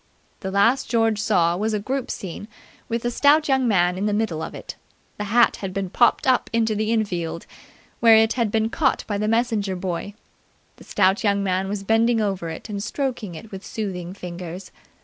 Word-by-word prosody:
The 190 - -4
last 230 +7 +2
George 225 -3 +2
saw 175 -7 +2
was 215 +3 -1
a - - -1
group 260 +4 -3
scene 195 +2 -6 0.4
with 230 0 -2
the 240 - 0
stout 295 +5 +4
young 265 -2 +2
man 180 -3 +2
in 205 - 0
the 205 - 0
middle 210 -8 -1
of 160 - -6
it. - - -8 0.4
The 210 - -2
hat 235 +3 +3
had 190 -2 -6
been 195 -2 -3
popped 240 - +3
up 260 -1 +2
into 225 -1 +1
the 215 +1 -1
infield, 175 -7 -2 0.5
where 230 -1 +7
it 220 0 +4
had 235 -4 0
been 220 +1 0
caught 280 -5 +1
by 205 -2 -2
the 210 - 0
messenger 220 -4 0
boy. 185 +2 -4 0.6
The - - -15
stout 190 +4 +2
young 200 -1 +2
man 190 0 -1
was 200 -1 -3
bending 225 +2 +3
over 195 -5 -1
it 160 - -7
and 205 -2 -4
stroking 240 - -3
it 210 +7 -11
with 195 0 -8
soothing 185 -4 -5
fingers. 180 0 -8
210 Hz, 200 wpm, -23 LUFS, 190-230 Hz, 0.6 s, where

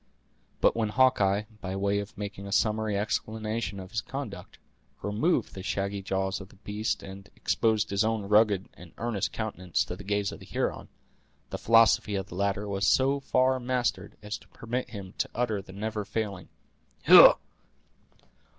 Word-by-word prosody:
But - - +4
when 110 -2 0
Hawkeye, 105 -5 +3 0.2
by 95 0 -4
way 100 +1 +1
of 100 -2 -7
making 100 -1 -6
a - - -7
summary 105 +1 +1
explanation 110 0 -2
of 95 0 -9
his 115 - -1
conduct, - - -7 0.5
removed 110 +13 0
the 95 - -7
shaggy 100 +1 -2
jaws 95 0 -2
of 95 - -11
the - - -19
beast, 105 +2 -3
and 95 0 -10
exposed 110 -2 +1
his 100 +1 +2
own 110 -1 0
rugged 105 -1 +3
and 90 -2 -14
earnest 115 -5 -2
countenance 95 -6 -2
to 90 - -6
the 100 - -10
gaze 100 0 -1
of - - -9
the - - -13
Huron, - - -2 0.6
the - - -4
philosophy 115 -2 +4
of 95 0 -3
the - - -8
latter 100 +2 -1
was 100 0 0
so 135 +1 +3
far 130 -1 +2
mastered 120 -6 -2
as 105 +1 -5
to - - -20
permit 125 +2 -4
him 100 -5 -8
to - - 0
utter 110 -4 0
the 95 - -14
never 105 +2 -3
failing: 100 -3 -4 0.5
"Hugh!" - - +10
105 Hz, 170 wpm, -28 LUFS, 100-110 Hz, 0.6 s, Hugh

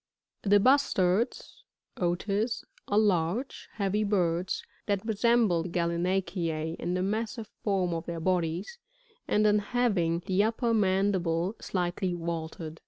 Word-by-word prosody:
The 205 0 +4
Bustards, 230 - +2 0.2
— - - -50
0/w, 195 +5 0 0.2
— - - -32
are 205 - +1
large, 205 +4 0
heavy 205 0 0
birds 180 -3 0 0.2
that 200 0 0
resem* 230 +1 +3
ble 170 -3 +1
the 175 - -5
Gallinaceae 170 -2 -1
in 175 +1 -2
the 185 - 0
massive 220 +2 -3
form 190 -4 +1
of 165 -1 -4
their 170 -1 -3
bodies, 180 - -1 0.5
and 210 +1 +2
in 210 0 +4
having 200 -7 0
the 190 +1 +2
upper 230 +2 0
mandible 190 -3 +1
slightly 180 0 -2
vaulted. 165 -1 -5
190 Hz, 135 wpm, -29 LUFS, 170-210 Hz, 0.5 s, The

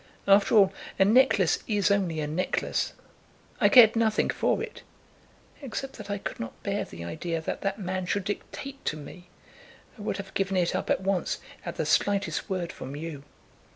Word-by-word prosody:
After 200 +3 +5
all, 195 -2 +6 0.2
a 190 - +5
necklace 215 -5 +4
is 205 -2 +2
only 180 -6 +1
a - - -1
necklace. 160 +5 -1 0.7
I - - +5
cared 235 -4 +8
nothing 225 -2 +2
for - - 0
it, - - -8 0.8
except 270 0 -5
that 210 -2 -9
I 200 - -1
could - - -6
not 115 0 -7
bear - - -1
the 85 - -9
idea 165 - -3
that 160 - -4
that 195 0 -1
man 185 -2 -3
should 200 +1 0
dictate 270 +7 -6
to 155 - -1
me. 175 +4 -11 0.7
I 220 - -12
would 210 - -2
have 195 -1 -8
given 195 -1 0
it 175 -2 +2
up - - -2
at - - +2
once, 190 -1 0 0.3
at - - -5
the - - -1
slightest 200 -5 +1
word 180 -3 -2
from 135 +2 -8
you." 155 -2 -6
195 Hz, 185 wpm, -27 LUFS, 170-205 Hz, 0.8 s, cared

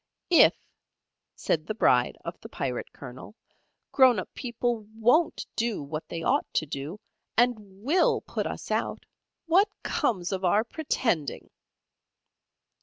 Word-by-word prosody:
"If," 340 - +7 0.8
said 155 -1 -1
the 215 - -3
Bride 125 - +3
of - - -6
the - - -10
Pirate 125 -3 -4
Colonel, 130 - -10 0.6
"grown 260 -4 +6
up 185 - -5
people 235 -3 -2
WON'T 245 +9 +3
do 225 -8 -1
what 155 +2 -6
they 165 -1 -4
ought 280 - +1
to 155 - +2
do, 145 +7 -6 0.4
and 215 -5 +1
WILL 375 - +3
put - - -3
us - - -6
out, - - -1 0.4
what 375 +5 +4
comes 180 -6 0
of 190 -1 -3
our 195 +4 +3
pretending?" 225 - -2
215 Hz, 130 wpm, -27 LUFS, 160-250 Hz, 0.8 s, If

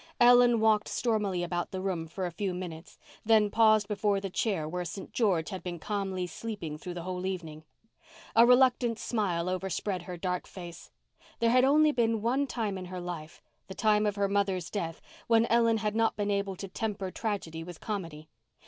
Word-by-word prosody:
Ellen 245 -1 +6
walked 215 -1 +3
stormily 210 -6 0
about 175 0 -2
the 190 - -5
room 185 -4 -2
for 185 +4 -4
a 175 - -3
few 190 +1 -3
minutes, 170 -3 -8 0.3
then 215 -2 +4
paused 215 -2 +4
before 205 -1 +1
the 195 -1 -5
chair 185 -7 -1
where 180 +3 -3
St. 190 +3 -7
George 180 -9 +1
had 190 - -5
been 175 -1 -5
calmly 190 0 -3
sleeping 180 -5 -6
through 180 +1 -7
the 170 - -5
whole 180 0 -4
evening. 160 -5 -5 0.7
A 230 +1 +7
reluctant 250 -2 +4
smile 190 -8 -1
overspread 185 0 -2
her 175 0 -7
dark 180 0 -3
face. 175 -2 -10 0.5
There 230 0 +2
had 255 +1 +5
been 265 - +4
only 305 +1 +5 0.2
one 245 +6 0
time 215 -6 -2
in 185 - -7
her 180 0 -6
life—the 175 +2 -9
time 215 -1 +3
of 205 - -1
her 200 -1 +1
mother's 195 -3 0
death—when 205 +5 -1
Ellen 230 -1 +3
had 215 -1 -2
not 225 0 +2
been 205 -1 -1
able 200 -1 -1
to 195 - -7
temper 195 -1 -3
tragedy 180 -8 -4
with 175 0 -10
comedy. 165 -8 -5
195 Hz, 185 wpm, -29 LUFS, 180-220 Hz, 0.7 s, A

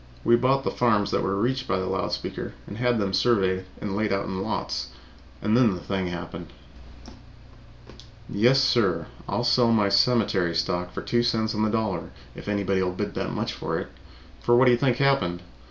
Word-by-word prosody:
We 120 - +5
bought 130 +3 +2
the - - -1
farms 110 -4 +1
that - - +1
were 95 +1 -1
reached 125 +3 -1
by 95 - +1
the 95 - -2
loud 95 0 -2
speaker - - -4
and 100 - -8
had 125 -1 +2
them 100 -3 -1
surveyed 95 -3 +2
and 100 -2 -4
laid 105 0 0
out 100 0 0
in 95 0 -4
lots - - -3 0.6
and 105 +2 +2
then 120 -6 +4
the - - -6
thing 95 +1 -3
happened! 85 -1 -6 1.8
Yes, 125 +6 +3
sir, 95 -11 +2 0.2
I'll 120 - -1
sell 120 -1 +3
my 105 -3 +3
cemetery 100 -5 +2
stock 90 +1 -1
for - - -6
two 120 - +1
cents 110 -2 0
on 105 - -2
the 110 - +2
dollar, 105 -6 -2 0.2
if - - -11
anybody 100 -2 0
will 90 -1 -1
bid 100 +2 -4
that - - -3
much - - -3
for - - -3
it. - - -5 0.5
For 120 - +3
what 125 +2 +6
do 125 - +6
you 120 - +4
think 125 -3 +2
happened? 135 -11 +1
105 Hz, 200 wpm, -25 LUFS, 95-120 Hz, 1.8 s, what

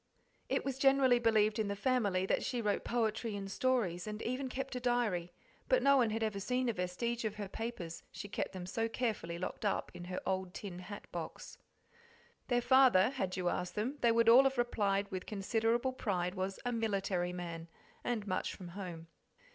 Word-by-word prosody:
It - - 0
was 270 -1 -2
generally 270 -2 +5
believed 220 -2 +3
in 215 - +1
the 200 - -2
family 205 -5 +1
that - - +1
she 250 - -1
wrote 210 -3 0
poetry 225 -2 -1
and 195 -1 -5
stories, 215 -8 0
and 210 0 -4
even 255 +2 -2
kept 270 +1 -4
a - - -1
diary, 235 -9 0 0.4
but - - +4
no 280 0 +6
one 240 -4 +4
had 225 +1 -1
ever 215 -2 -1
seen 250 +5 0
a - - +1
vestige 215 +6 -2
of 215 -2 -2
her 205 -1 -4
papers, 190 -6 -5
she 205 - -7
kept 195 - -3
them 185 -2 -6
so 225 +5 -1
carefully 215 -9 -2
locked 185 - -5
up 205 -2 0
in 175 - -8
her 180 +1 -3
old 185 -1 -2
tin 185 -4 -6
hat 200 +3 -8
box. - - -7 0.9
Their 245 -1 +2
father, 255 -5 +6
had 195 -9 -2
you 180 -1 -1
asked 180 0 -1
them 255 +8 -2
they 235 - +5
would 230 0 +3
all 250 +4 +9
have 270 -1 +2
replied 205 -5 +1
with 185 -1 -4
considerable 225 +5 0
pride, 180 -7 -1
was 190 0 -3
"a 245 - +1
military 195 -6 0
man," 170 -2 -6 0.4
and 230 -4 -1
much 185 -2 -2
from 180 -2 -9
home. 175 -3 -7
215 Hz, 195 wpm, -34 LUFS, 185-240 Hz, 0.9 s, all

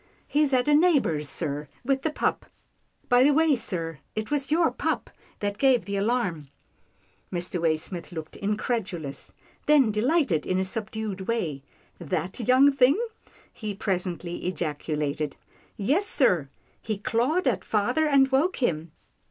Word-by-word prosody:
" - - -36
He's 295 -1 +2
at 255 0 +2
a 295 - +4
neighbour's, 285 - +3
sir, 145 +1 -2 0.2
with 270 0 +1
the 315 - 0
pup. 300 - -1 0.6
By 245 0 +5
the 285 +1 +4
way, 320 -2 +4
sir, 165 - -3 0.2
it 215 +3 -4
was 285 -2 0
your 330 +2 +3
pup - - -2 0.3
that 205 0 -2
gave 260 -7 +4
the 200 +1 -3
alarm." 200 - 0 0.8
Mr. 175 0 -3
Waysmith 165 +2 -1
looked 160 -3 -7
incredulous, 200 - -3 0.4
then 285 -7 +5
delighted 220 - +1
in 185 - +1
a 190 - +1
subdued 210 -1 -4
way. 165 -12 -1 0.2
" - - -35
That 180 +3 -3
young 255 +4 +5
thing? 275 - +4 0.3
" - - -27 0.2
he 210 -3 -5
pres 190 -3 -1
ently 175 0 -5
ejaculated. 150 -4 -2 0.3
" - - -34
Yes 290 - +1
sir, 180 - +3 0.3
he 215 -2 -3
clawed 255 - 0
at 205 -8 +1
father 245 +9 +1
and 275 -2 +5
woke 305 +8 +2
him. 165 - -1
215 Hz, 155 wpm, -26 LUFS, 175-270 Hz, 0.8 s, By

